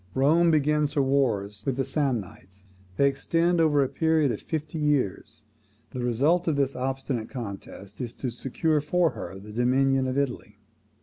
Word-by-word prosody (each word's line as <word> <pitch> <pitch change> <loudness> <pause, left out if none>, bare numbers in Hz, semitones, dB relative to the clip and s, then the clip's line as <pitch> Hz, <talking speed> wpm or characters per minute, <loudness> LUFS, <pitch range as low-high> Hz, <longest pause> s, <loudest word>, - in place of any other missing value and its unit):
Rome 160 +6 +4
begins 150 -1 +2
her 145 - +2
wars 105 -7 0
with 135 - -1
the 135 0 -1
Samnites: 110 - -3 0.3
they 140 - +4
extend 165 +5 +1
over 145 -3 +4
a - - 0
period 160 -2 +1
of 105 - -5
fifty 155 0 -4
years. 145 -9 -1 0.5
The 125 - -4
result 145 +10 +2
of 160 - +2
this 140 -1 0
obstinate 130 -2 -3
contest 100 -3 -8
is 120 -2 -5
to 125 - -4
secure 150 +5 0
for 170 +3 +1
her 90 +2 -7
the 105 +2 -11
dominion 130 +3 +2
of 130 +1 -2
Italy. 140 -3 -3
135 Hz, 165 wpm, -26 LUFS, 120-150 Hz, 0.5 s, Rome